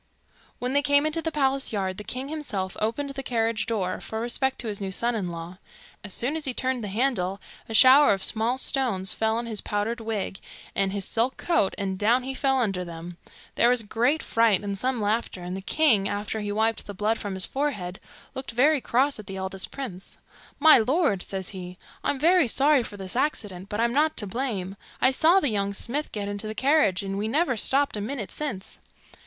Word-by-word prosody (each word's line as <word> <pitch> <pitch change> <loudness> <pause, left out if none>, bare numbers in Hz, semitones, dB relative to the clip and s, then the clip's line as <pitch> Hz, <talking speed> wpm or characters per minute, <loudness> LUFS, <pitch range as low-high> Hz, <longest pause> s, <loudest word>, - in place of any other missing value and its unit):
When 250 +1 -3
they 285 - +3
came 285 +1 +3
into 310 +1 0
the 325 - -2
palace 275 -2 +1
yard, 190 -3 -2
the - - -6
king 255 +5 -5
himself 245 -12 -4
opened 255 +6 -1
the 275 0 -5
carriage 230 -3 -1
door, 190 -5 -1
for 220 - -5
respect 260 +3 0
to 235 - -6
his 205 -1 -3
new 195 - -2
son 235 +6 0
in 200 -6 -2
law. 170 +2 -8 0.4
As 205 - -6
soon 250 +10 0
as 320 - -3
he 260 -3 -2
turned 260 -2 -1
the - - -3
handle, 200 -3 0 0.3
a 225 - -2
shower 265 +5 +8
of 195 -1 0
small 230 +3 +1
stones 230 -9 0
fell 220 0 0
on 235 - -3
his 220 -3 -3
powdered 215 +3 -2
wig 215 -3 -3 0.3
and 195 -1 0
his 195 -1 -2
silk 235 +5 0
coat, 335 - +1
and 190 -1 -3
down 235 +5 +3
he 265 +1 -3
fell 270 0 +1
under 195 -6 0
them. 170 0 -8 0.4
There 240 - +4
was 245 -2 +2
great 245 +9 +1
fright 225 -4 +3
and 200 -1 -3
some 250 +4 -1
laughter, 210 -3 -1
and 180 +1 -4
the 190 - -5
king, 215 -4 +2
after 205 +2 -3
he 205 -1 -3
wiped 220 +1 0
the 205 - -7
blood 215 +4 0
from 200 -2 -4
his 185 - +1
forehead, 205 -11 -3 0.3
looked 265 -2 -6
very 280 +4 +4
cross 265 +2 +1
at 210 - -10
the 195 - -6
eldest 190 0 -4
prince. 205 -9 -6 0.4
'My 310 -1 +8
lord,' 260 - +1
says 190 -1 -4
he, 180 -2 -8 0.3
'I'm 285 - 0
very 340 +1 +4
sorry 280 +3 +3
for 210 -3 -8
this 190 +1 -4
accident, 205 -9 -2
but 210 - -3
I'm 235 +1 +2
not 310 +3 +2
to 210 - -2
blame. 200 -4 -3 0.2
I 260 - +4
saw 325 +7 +5
the 290 - +1
young 200 -2 -1
smith 280 +9 -3
get 205 -2 -4
into 205 +1 -4
the 215 - -5
carriage, 260 -8 +3
and 195 0 -3
we 210 - -1
never 275 +2 +1
stopped 275 +5 +2
a 210 - -3
minute 220 -1 -4
since. 245 -11 -4
225 Hz, 215 wpm, -26 LUFS, 195-265 Hz, 0.4 s, shower